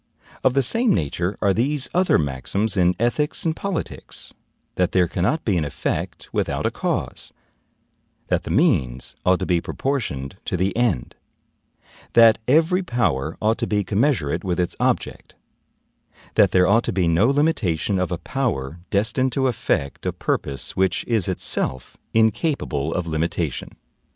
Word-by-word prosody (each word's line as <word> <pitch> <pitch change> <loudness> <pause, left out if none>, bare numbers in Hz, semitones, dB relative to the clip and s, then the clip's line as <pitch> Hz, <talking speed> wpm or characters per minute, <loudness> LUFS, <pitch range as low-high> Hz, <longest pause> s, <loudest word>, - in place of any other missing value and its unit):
Of 130 0 +3
the 135 - +3
same 230 - +2
nature 85 +4 -1
are 100 -1 +4
these 130 +5 0
other 180 +1 +3
maxims 80 +10 -1
in 90 -1 +3
ethics 150 +9 0
and 160 -1 +1
politics, 195 -2 -5 0.4
that 90 -1 0
there 90 -2 +4
cannot 105 - -1
be 100 -5 +2
an 80 - +1
effect 70 - -3
without - - -1
a - - +1
cause; - - -3 0.9
that - - 0
the - - -8
means 75 - +1
ought 90 0 +5
to - - -3
be 85 -2 +1
proportioned 95 - -3
to 95 - -1
the 95 +3 0
end; 115 - 0 1.0
that 115 -2 +7
every 165 +7 +4
power 85 - -1
ought 110 +2 +2
to 120 - -1
be 105 -1 +1
commensurate 100 - 0
with 90 -2 -1
its 90 - -1
object; - - -1 1.0
that - - +5
there 90 0 +4
ought 115 +4 +4
to - - -1
be 90 -2 +1
no 85 +7 +4
limitation 115 - +1
of 90 0 -1
a 90 - -1
power 85 - -3
destined 120 +6 +1
to 135 0 +1
effect 75 - -1
a - - +1
purpose 70 -1 -3
which 95 0 +1
is 110 -6 +1
itself 65 -8 -2 0.2
incapable 110 - +1
of 90 0 -2
limitation. 80 -2 -2
100 Hz, 155 wpm, -22 LUFS, 85-130 Hz, 1.0 s, that